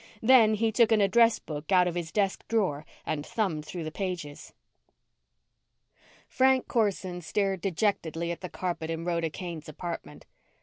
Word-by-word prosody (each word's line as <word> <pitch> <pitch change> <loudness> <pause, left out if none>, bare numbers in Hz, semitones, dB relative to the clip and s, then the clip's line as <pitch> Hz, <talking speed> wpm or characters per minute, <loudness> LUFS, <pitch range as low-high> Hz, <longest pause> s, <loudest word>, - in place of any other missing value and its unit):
Then 225 -3 +6
he 225 +1 +1
took 230 0 +4
an 220 - +5
address 230 +3 +4
book 150 +2 -7
out 180 -1 +5
of 175 - -1
his 170 -2 -4
desk 195 -2 -1
drawer 185 -10 0 0.2
and 145 -2 -2
thumbed 165 -6 -2
through 170 +2 -6
the 155 - -5
pages. 175 -5 -5 1.8
Frank 260 0 +3
Corson 190 -5 -1
stared 190 +3 -1
dejectedly 170 -3 -1
at 170 - -6
the 180 - -6
carpet 170 -3 -4
in 165 0 -3
Rhoda 170 -2 0
Kane's 165 -2 -7
apartment. 170 +3 -7
180 Hz, 155 wpm, -28 LUFS, 165-210 Hz, 1.8 s, Then